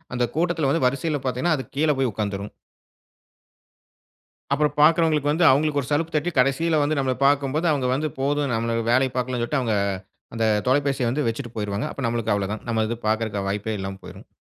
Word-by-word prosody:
அந்த 125 - +1
கூட்டத்துல 165 -4 +1
வந்து, 165 -4 +1
வரிசையில 145 +2 -2
பாத்தீங்கன்னா, 130 +6 +1
அது 130 - -6
கீழ 150 +2 +2
போய் 130 -4 +1
உக்காந்துரும். 100 -1 -4 2.0
அப்புறம் 150 -1 +1
பாக்கிறவங்களுக்கு 155 -2 +4
வந்து, 170 +3 +1
அவுங்களுக்கு 145 +2 +2
ஒரு 125 - -8
சலுப்பு 165 +3 0
தட்டி, 155 +4 +1
கடைசில 150 +5 +2
வந்து 155 +1 0
நம்பள 130 -1 +1
பாக்கும்போது 145 +3 +2
அவுங்க 135 -4 0
வந்து 155 +2 -1
போதும், 140 0 0
நம்மள 115 +1 -1
வேலைய 130 +1 +3
பாக்கலான்னு 125 -1 -1
சொல்ட்டு, 135 +3 0
அவுங்க 115 -3 0 0.6
அந்த 115 -1 0 0.2
தொலைபேசிய 135 -2 +1
வந்து 145 +4 -1
வெச்சுட்டு 120 +1 -4
போயிருவாங்க. 105 0 -2
அப்ப 140 - -7
நம்மளுக்கு 115 -2 0
அவ்ளோதான். 100 +1 -3
நம்ம 110 -1 +1
இது 115 - -3
பாக்கறதுக்கான 110 -2 -1
வாய்ப்பே 105 +2 -2
இல்லாம 95 0 -5
போயிருஙம். - - -12
130 Hz, 175 wpm, -23 LUFS, 115-150 Hz, 2.0 s, பாக்கிறவங்களுக்கு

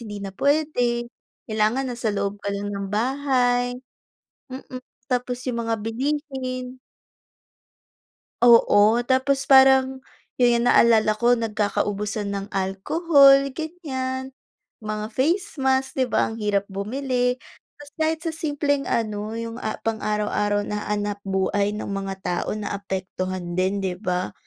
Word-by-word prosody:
hindi 205 -3 -7
na 195 - -5
puwede 245 -3 0 0.4
kailangan 220 +4 0
na - - -7
sa 225 - -1
loob 200 0 -2
ka 200 - -4
lang 205 +1 -4
ng 200 0 -4
bahay. 245 +1 +1 0.7
Mm, 260 0 -8 0.3
tapos 250 0 -1
yung 245 -3 -2
mga 225 - +1
bilihin. 255 0 -3 1.6
Oo, 230 -2 +6
tapos 270 +1 +1
parang 265 -1 +5 0.3
'yon 240 -1 +3
yung 235 - 0
naalala 225 -3 +5
ko 240 +2 +3
nagkakaubusan 210 -1 -1
ng 195 0 -4
alcohol 275 - +4
gan'yan 265 -5 -4 0.5
mga 215 0 -3
face 335 +9 0
mask, 265 0 +1
di 260 - +3
ba? - - +2
Ang 225 - -6
hirap 200 -1 0
bumili 250 +5 -1 0.4
tas 290 0 -12
kahit 315 0 0
sa 330 - +1
simpleng 290 -3 -1
ano 215 -1 -2
yung 230 0 -5
a 215 - -2
pang 225 -1 -1
araw-araw 210 -1 0
na 210 0 -3
hanapbuhay 205 -1 -1
ng 210 - -5
mga 195 -1 -3
tao 175 - -2
naapektuhan 185 -3 -4
din, 190 +2 +1
di 185 -2 -1
ba? 180 -2 -2
235 Hz, 130 wpm, -23 LUFS, 205-265 Hz, 1.6 s, Oo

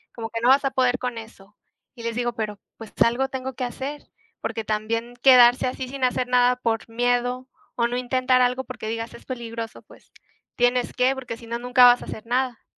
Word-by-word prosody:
como 225 -1 -5
que, 230 0 -4
no 245 - +3
vas 275 +1 +5
a 270 - +1
poder 250 -1 +2
con 250 -2 -4
eso", 210 -2 -14 0.4
y 235 - -10
les 230 -1 -3
digo 240 -1 -1
"Pero 215 -3 -4 0.2
pues 225 -2 -11
algo 260 +3 0
tengo 265 0 -5
que 255 - -5
hacer", 270 +4 -5 0.4
porque 225 - -3
también 230 +3 -2
quedarse 250 -1 +6
así 255 0 -4
sin 270 0 -6
hacer 250 0 +1
nada 250 0 +3
por 230 -2 -2
miedo 245 +2 0 0.3
o 235 -1 +1
no 245 - -4
intentar 255 0 +2
algo 250 +1 +1
porque 250 -4 -7
digas 230 +1 -4
"es - - -14
peligroso", 230 -3 -6
pues, - - -20 0.4
tienes 245 0 +1
que, 255 +2 +2
porque 250 -3 -6
si 230 - -13
no, 235 +1 -3
nunca 250 +1 +5
vas 245 0 +6
a - - -8
hacer 220 +1 -8
nada. 250 -1 -1
245 Hz, 210 wpm, -24 LUFS, 230-255 Hz, 0.4 s, quedarse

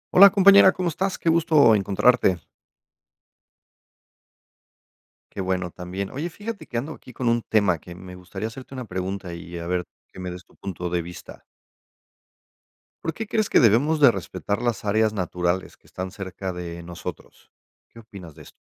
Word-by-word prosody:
Hola 200 +2 +10
compañera, 195 0 +7
¿cómo 180 -2 -1
estás? 185 +4 -2
Qué - - -7
gusto 160 -7 +5
encontrarte. 100 0 +3 2.9
Qué 100 - -5
bueno 90 -1 -2
también. 95 +3 -6
Oye, 150 +6 -4
fíjate 205 +5 -7
que 120 - -4
ando 145 +7 -3
aquí 125 - -14
con 120 +1 -3
un 120 0 +2
tema 100 -7 +2
que 85 +2 -11
me 90 0 -10
gustaría 95 +3 -6
hacerte 130 +4 -10
una 130 -2 -6
pregunta 95 -1 -4
y 85 +1 -8
a 85 - -6
ver, 90 0 0 0.3
qué - - -12
me 90 - -4
des 90 +1 -9
tu - - -25
punto 90 -2 -5
de 90 0 0
vista. 85 +1 -11 1.6
¿Por 165 - -2
qué 220 +5 -5
crees 215 -1 0
que - - +5
debemos 135 +8 +4
de 140 -5 +7
respetar 100 +2 -4
las 120 -4 -2
áreas 110 +1 +2
naturales 90 -2 -2
que - - -27
están 95 0 -6
cerca 95 -1 -6
de 85 -1 -6
nosotros? 85 0 -9 0.4
¿Qué 115 - -15
opinas 100 -7 -12
de 75 0 -14
esto? - - -15
100 Hz, 170 wpm, -24 LUFS, 90-135 Hz, 2.9 s, Hola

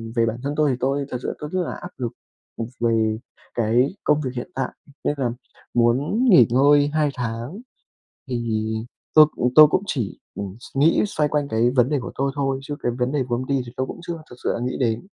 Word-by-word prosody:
về 115 -1 +3
bản 115 0 -2
thân 140 +1 -2
tôi, 150 -1 +3
thì 125 - -1
tôi 140 +2 0
thật 125 - -3
sự - - -2
tôi 150 - -5
rất 185 - +1
là - - -4
áp - - -7
lực, 120 -3 -3 0.5
một 115 - -2
về 110 -2 +2 0.4
cái 120 - +2
công 150 0 +3
việc 130 -4 -3
hiện 125 +8 -5
tại, 130 -1 -1 0.3
nên - - +1
là 125 -4 0 0.4
muốn 130 - +2
nghỉ 155 - +8
ngơi 145 +4 +5
2 155 -1 +2
tháng, 120 - -4 0.7
thì 115 -3 -1 0.5
tôi 155 -1 +9
cũng 125 0 +1
tôi 155 0 +10
cũng 185 - +1
chỉ, 120 - -3 0.2
ừm, 100 -1 -6
s 130 - -13
nghĩ 150 +5 +4
xoay 150 -7 0
quanh 145 -1 0
cái 115 +1 +2
vấn 125 0 +5
đề 150 0 +1
của 120 - -7
tôi 135 0 -1
thôi, 135 -2 0
chứ 145 +1 -5
cái 120 - 0
vấn 125 +1 0
đề 145 -2 +1
của 120 - +1
công 130 +2 -4
ty 135 -1 +1
thì 120 - -10
tôi 130 - -1
cũng - - -8
chưa 170 -2 -5
thực 125 - -11
sự - - +1
là - - -3
nghĩ 125 +1 -2
đến. 115 -3 +1
130 Hz, 240 wpm, -23 LUFS, 120-145 Hz, 0.7 s, tôi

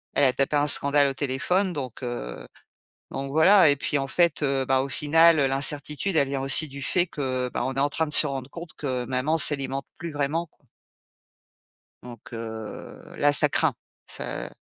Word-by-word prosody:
elle 145 - +2
a 130 -2 +4
tapé 135 +3 0
un 145 0 +2
scandale 140 0 +4
au 135 - -2
téléphone, 180 +9 -1
donc, 130 -6 -6
heu, 90 - -6 0.6
donc 135 0 -5
voilà. 175 +4 +6
Et 145 - +3
puis, 145 +1 -2
en 135 - -3
fait, 170 0 0
heu, 135 -1 0
bah, 130 0 +1
au 135 - -3
final, 160 +4 +4
l'incertitude, 145 +5 -1
elle 140 -3 +2
vient 135 -1 -3
aussi 135 +3 +2
du 140 0 -10
fait 175 +6 +1
que, 130 -5 -3
bah, - - -2
on 130 - -3
est 135 - -1
en 145 +1 +1
train 160 +2 0
de 150 - -7
se - - +6
rendre 135 -2 -5
compte 170 +1 -9
que 130 -4 -3
maman 130 +5 -1
s'alimente 140 -3 +2
plus 170 -2 -6
vraiment, 145 +4 -2
quoi. 150 - -38 1.4
Donc 125 +1 -12
heu, 110 -1 -8 0.2
là, 145 0 +2
ça - - +4
craint! - - +1 0.4
Ca - - -6
140 Hz, 195 wpm, -24 LUFS, 130-155 Hz, 1.4 s, voilà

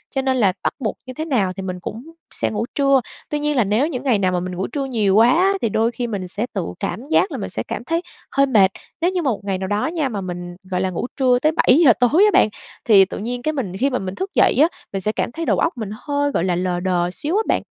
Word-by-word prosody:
cho 270 - +2
nên 265 -1 0
là 200 -6 +3
bắt - - 0
buộc 225 -5 -2
như 255 - -7
thế 310 +5 -4
nào 215 - 0
thì 195 - -6
mình 185 -1 -4
cũng 220 +6 -7 0.3
sẽ - - -1
ngủ 215 +1 -2
trưa. 275 -2 +4 0.3
Tuy 295 - -1
nhiên 295 0 0
là 245 - +4
nếu 215 +9 +1
những 260 -6 -4
ngày 250 -7 +2
nào 185 -2 +1
mà 180 - 0
mình 180 +1 -5
ngủ 190 +2 -2
trưa 280 -2 -3
nhiều 215 -7 +1
quá 225 +3 +6
á, 365 +8 +3
thì 230 - +1
đôi 225 +3 +1
khi 240 0 -3
mình 200 -5 -4
sẽ 205 +5 -3
tự - - -2
cảm 255 - -4
giác 375 - +3
là - - -4
mình - - -4
sẽ - - -3
cảm - - -5
thấy 330 +6 -1 0.3
hơi 275 0 +3
mệt. 210 -8 +4 0.3
Nếu 350 +2 +2
như 365 -1 -1
mà 275 -6 +1
một 205 - -3
ngày 195 -2 -1
nào 190 0 -4
đó 205 +8 0
nha, 315 -4 -1
mà 210 -5 -4
mình, 175 -1 -6 0.2
gọi 180 0 0
là, 190 - 0
ngủ 185 +6 -3
trưa 255 -2 +3
tới 305 +4 +2
7 270 -4 +4
giờ 245 - +8
tối 275 - +4
á 420 - +4
bạn, - - +5 0.4
thì 200 -4 +7
tự - - -7
nhiên 245 +4 -4
cái 310 +4 -1
mình 205 -11 -4
khi 270 +7 +2
mà 255 - -1
mình 190 0 -5
thức 385 +1 -4
dậy - - +4
á, 310 - +7 0.3
mình 195 - -2
sẽ 210 - +1
cảm 225 - -2
thấy 330 +4 -4
đầu - - +1
óc 330 - 0
mình 220 -4 -4
hơi, 285 +4 -1
gọi 170 - 0
là, 180 -2 +1
lờ 180 0 -1
đờ 175 -1 0
xíu 300 - -3
á - - +3
bạn. - - +1
235 Hz, 300 wpm, -20 LUFS, 190-280 Hz, 0.4 s, giờ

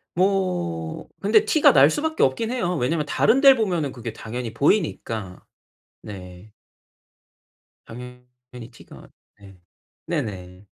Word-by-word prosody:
뭐 180 - -1
근데 210 +2 +3
티가 310 - +4
날 140 +1 +6
수밖에 315 - -2
없긴 180 - +1
해요. 180 -8 -1
왜냐면 150 +3 -1
다른 245 - +2
델 275 -1 +8
보면은 175 - -1
그게 115 -2 -7
당연히 115 +1 -6
보이니까. 115 - -1 0.6
네. 95 +1 -11 1.3
당연히 125 0 -12
티가 115 - -15 0.3
네. 95 -2 -16 0.5
네네. 90 -1 -5
125 Hz, 220 characters per minute, -23 LUFS, -, 1.3 s, 델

